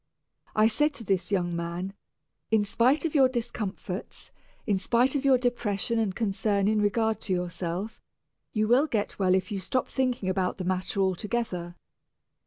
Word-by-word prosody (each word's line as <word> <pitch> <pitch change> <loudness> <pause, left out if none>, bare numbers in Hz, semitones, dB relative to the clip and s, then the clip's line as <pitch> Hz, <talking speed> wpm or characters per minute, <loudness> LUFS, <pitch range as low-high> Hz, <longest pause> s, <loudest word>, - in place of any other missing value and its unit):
I 215 - +5
said 295 +6 +1
to 235 - -6
this 190 -2 0
young 175 -3 0
man, 170 +3 -4 0.6
"In 220 -2 +3
spite 250 +10 +2
of 320 - -1
your 270 -4 +5
discomforts, 215 -6 -5 0.3
in 200 -4 +1
spite 240 +6 +2
of 280 - 0
your 270 -2 +5
depression 235 -2 0
and 200 -4 0
concern 200 -2 0
in 215 0 +2
regard 220 +2 +1
to 190 - -1
yourself, 180 +3 -3 0.5
you 215 -1 +1
will 255 +7 +4
get 210 -7 -2
well 185 -1 +4
if 185 +1 -1
you 205 - -1
will - - -5
stop 255 +7 -1
thinking 255 -7 -1
about 185 -1 0
the 185 - -4
matter 185 +1 -1
altogether. 190 -2 -2
205 Hz, 170 wpm, -27 LUFS, 185-235 Hz, 0.6 s, I